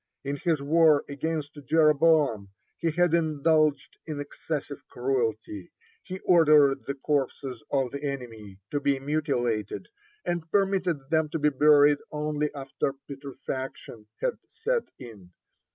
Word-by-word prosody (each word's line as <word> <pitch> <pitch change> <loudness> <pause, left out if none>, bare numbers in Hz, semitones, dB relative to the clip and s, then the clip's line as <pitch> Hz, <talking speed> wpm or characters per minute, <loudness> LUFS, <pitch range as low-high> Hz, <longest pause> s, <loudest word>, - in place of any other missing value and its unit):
In 140 +1 -3
his 160 +1 0
war 155 0 +4
against 145 0 -4
Jeroboam 150 -7 +3 0.3
he 165 - -1
had 175 +1 +2
indulged 155 -2 +1
in 150 -2 -4
excessive 145 0 -5
cruelty; 115 -7 -2 0.3
he 185 - -7
ordered 150 -5 +5
the 140 - -2
corpses 135 -3 -2
of 135 -3 +1
the 140 +1 -6
enemy 115 -8 -6
to 145 - 0
be 140 -1 +1
mutilated, 135 -7 -2 0.4
and 170 -2 -2
permitted 185 -7 0
them 160 -1 +2
to 155 - -2
be 150 -1 +3
buried 145 0 +5
only 150 0 -2
after 135 0 -3
putrefaction 135 -5 -7
had - - -1
set 460 +2 -1
in. 105 -8 -12
145 Hz, 125 wpm, -27 LUFS, 135-160 Hz, 0.4 s, ordered